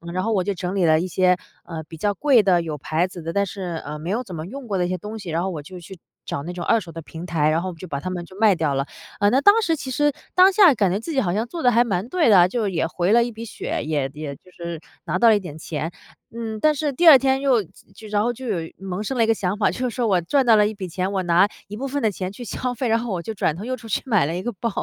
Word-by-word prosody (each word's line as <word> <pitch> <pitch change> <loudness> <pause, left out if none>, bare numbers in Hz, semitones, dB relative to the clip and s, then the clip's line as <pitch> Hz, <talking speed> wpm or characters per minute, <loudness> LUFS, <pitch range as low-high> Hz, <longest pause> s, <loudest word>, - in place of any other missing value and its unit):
然 185 - 0
后 225 - 0
我 190 -3 +1
就 200 +1 -1
整 180 +1 -4
理 190 - +1
了 155 0 +4
一 180 - -2
些， 180 0 +2 0.3
呃， 160 -2 -6
比 160 +1 -12
较 205 +5 0
贵 265 -1 +4
的、 180 -3 +3
有 155 -2 -4
牌 160 +5 0
子 185 -1 -10
的， 165 +1 -4
但 200 +2 +2
是， 180 -4 -5
呃， 150 +1 -5
没 160 +3 -6
有 235 +5 -1
怎 190 -7 -8
么 155 0 -5
用 260 +6 -8
过 195 -2 -1
的 180 - +1
一 175 - -3
些 185 - -1
东 210 +5 -7
西， 185 -4 -8
然 165 +2 0
后 190 - -1
我 165 -5 -5
就 180 +3 -10
去 180 +3 -11 0.3
找 140 - -4
那 175 +2 -6
种 175 -1 -5
二 230 - +3
手 170 -4 -10
的 165 - -7
平 160 +3 -9
台， 155 -4 +1
然 160 +2 +1
后 185 - -4
就 170 +3 -10
把 140 -4 -3
它 185 - -5
们 175 -1 -4
就 185 +3 -14
卖 215 -3 +5
掉 150 -4 0
了。 135 - 0 0.3
呃， 205 0 +4
那 265 +2 +3
当 410 +2 +6
时 330 -6 +1
其 270 -3 -7
实 295 +2 +1 0.2
当 370 +2 +7
下 385 -7 +7
感 195 -4 +2
觉 195 - 0
自 230 - -6
己 280 - +1
好 175 -8 0
像 220 +4 -1
做 330 +4 -6
得 245 - +5
还 235 +1 +4
蛮 200 -3 -2
对 330 -5 +2
的 200 - +7
啊， 175 - +6
就 215 +1 -1
也 170 -4 0
回 175 +3 -1
了 235 +1 +5
一 240 - -4
笔 225 +1 -8
血， 225 - -4
也 150 -3 -1
也 150 -2 -6
就 185 +6 -21
是 170 -2 -6 0.3
拿 170 +3 -1
到 230 +3 +6
了 220 - +6
一 205 - +1
点 165 -6 -9
钱。 160 +1 -4 0.4
嗯， 225 -1 -5
但 305 +5 +3
是 295 0 -1
第 340 +6 +2
二 295 -4 +11
天 265 +1 +1
又 260 -6 +2
就 200 +5 -16
然 205 -1 +2
后 240 +3 0
就 255 +2 -8
有 170 -7 -2
萌 190 +1 -5
生 255 +4 -3
了 230 - +4
一 225 - +1
个 225 - +4
想 195 -2 -2
法， 210 - +2
就 255 -1 -2
说 240 0 -2
我 190 -4 +3
赚 265 - +1
到 230 -2 +6
了 210 0 +4
一 220 - -4
笔 200 -3 -6
钱， 185 +2 -2
我 190 - 0
拿 175 +3 +4 0.2
一 210 - -6
部 275 - -3
分 280 -1 -3
的 220 - +3
钱 185 -1 -4
去 245 - -9
消 250 +2 -3
费， 245 0 -2
然 225 - +3
后 240 0 -5
我 175 - -2
就 220 - -5
转 160 -6 0
头 195 - -7
又 255 +1 -3
出 230 - -12
去 215 - -1
买 210 - +3
了 165 - -2
一 180 - -4
个 240 - -2
包。 230 - 0
195 Hz, 350 characters per minute, -22 LUFS, 175-235 Hz, 0.4 s, 二